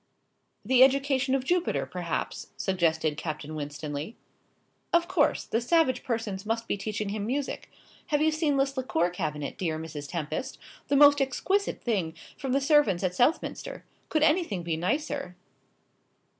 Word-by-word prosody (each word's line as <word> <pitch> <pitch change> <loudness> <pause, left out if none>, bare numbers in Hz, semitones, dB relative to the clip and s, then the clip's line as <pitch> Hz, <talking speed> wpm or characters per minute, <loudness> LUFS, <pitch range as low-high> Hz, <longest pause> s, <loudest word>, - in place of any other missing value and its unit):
"The 260 -1 +4
education 270 0 +3
of 265 - 0
Jupiter, 355 +5 0
perhaps," - - -4
suggested 160 -5 +1
Captain 155 -1 -5
Winstanley. 145 +4 -5 0.8
"Of 340 0 +3
course. 330 -5 +2
The 225 - 0
savage 260 -1 +2
persons 225 -6 -3
must 225 +1 -2
be - - 0
teaching 210 0 -3
him 205 0 -3
music. 275 +3 -3 0.4
Have 295 -2 +1
you 315 +1 +3
seen 310 -2 +1
this 275 0 +1
liqueur 180 - 0
cabinet, 150 -4 -4
dear 160 -4 -1
Mrs. 150 -3 -7
Tempest? 170 - -4 0.3
The 285 - +2
most 285 0 +7
exquisite 380 +10 0
thing, 185 -9 -1 0.2
from 270 -2 -4
the 275 +2 +2
servants 275 - +3
at 180 -1 0
Southminster. 325 - 0 0.2
Could 310 -1 +2
anything 305 - +2
be 165 -1 -1
nicer?" 275 - -2
240 Hz, 145 wpm, -28 LUFS, 170-285 Hz, 0.8 s, most